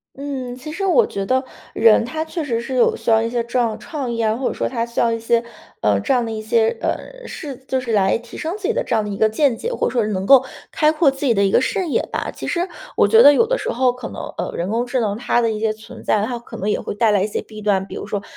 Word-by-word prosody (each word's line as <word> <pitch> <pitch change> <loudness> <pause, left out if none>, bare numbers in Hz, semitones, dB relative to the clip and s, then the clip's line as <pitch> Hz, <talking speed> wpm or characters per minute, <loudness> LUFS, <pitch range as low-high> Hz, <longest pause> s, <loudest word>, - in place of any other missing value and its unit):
嗯， 265 -3 -5
其 300 +4 -8
实 370 +6 -4
我 445 +6 +4
觉 195 0 -4
得 260 +3 +2 0.3
人 225 0 +5
他 310 +7 -3
确 320 0 -4
实 235 -5 -1
是 245 +3 -5
有 245 - +3
需 - - -1
要 220 - +5
一 230 - -1
些 240 -1 -1
这 245 +2 -1
样 235 -2 +2
的 215 - -6
创 275 -6 -5
意 230 - -3
啊， 220 -1 +1
或 255 +1 -2
者 - - -2
说 - - -2
他 235 -3 -2
需 235 0 -4
要 230 - +3
一 230 - -2
些， 230 +1 +1 0.4
呃， - - +2
这 275 - -2
样 245 -2 +2
的 225 - -4
一 215 0 -4
些， 225 +1 +2
呃， - - -4
是 285 -4 -7
就 260 - 0
是 245 -2 -4
来 195 -1 +3
提 235 0 -13
升 330 +5 -3
自 420 - -17
己 465 - +1
的 - - 0
这 235 - -1
样 220 - +1
的 205 - -4
一 195 - -4
个 220 - +3
见 255 +2 +2
解， 475 - -4
或 - - -1
者 - - -2
说 245 - +1
是 210 - -2
能 190 -1 -2
够 265 +2 +7 0.3
开 305 0 +3
阔 305 -3 +3
自 270 +2 -8
己 240 -5 +3
的 200 - +3
一 195 - +1
个 - - +4
视 365 +6 -1
野 - - +1
吧。 - - -3
其 - - -7
实 350 +2 -1 0.3
我 - - +4
觉 450 - +6
得 290 - +9
有 455 - +4
的 - - -1
时 - - -3
候 250 0 +2
可 250 -2 -7
能， - - -7 0.2
呃， - - -2
人 175 +2 -2
工 235 +2 0
智 255 0 0
能 205 -3 -1
它 245 0 +1
的 230 -1 +1
一 215 - -3
些 220 0 +1
存 215 +1 -11
在， 210 -1 +1
它 240 +1 -4
可 235 - -10
能 200 - -3
也 - - 0
会 - - -5
带 220 0 +3
来 200 - +2
一 200 - +1
些 210 - -4
弊 215 -1 -11
端。 195 -2 +1
比 - - -11
如 - - -6
说 205 -2 -3
235 Hz, 345 characters per minute, -20 LUFS, 220-275 Hz, 0.4 s, 得